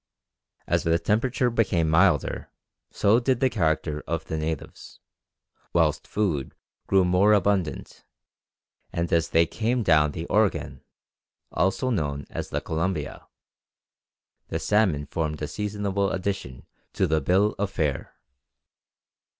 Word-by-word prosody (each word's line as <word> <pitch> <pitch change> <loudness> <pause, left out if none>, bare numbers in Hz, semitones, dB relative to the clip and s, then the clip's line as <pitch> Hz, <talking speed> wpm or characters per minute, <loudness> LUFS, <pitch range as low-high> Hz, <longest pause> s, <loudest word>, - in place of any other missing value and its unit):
As - - +1
the 85 0 +2
temperature 120 +6 0
became 95 -8 +1
milder, 80 +1 +2 0.4
so 105 +4 +3
did 125 0 +1
the 130 -1 +2
character 80 -5 0
of 80 0 -2
the - - -4
natives, 80 -1 -5 0.7
whilst 80 -3 +1
food 90 -11 -2 0.3
grew 95 -1 +4
more 90 +4 +4
abundant; 100 -4 0 0.9
and 85 0 -2
as 85 -1 +2
they 85 +1 +4
came 115 +6 -1
down 75 -5 +3
the 80 - -5
Oregon, 105 +1 0 0.7
also 95 +9 0
known 70 - -2
as - - -5
the - - -2
Columbia, 80 -1 -3 1.2
the 80 - -2
salmon 85 -4 +1
formed 75 -1 -3
a 75 - -3
seasonable 100 -1 -2
addition 90 -10 -4 0.3
to 95 - +1
the 80 -2 +1
bill 95 +8 +2
of 100 -1 0
fare. 75 -7 -2
90 Hz, 125 wpm, -25 LUFS, 80-105 Hz, 1.2 s, grew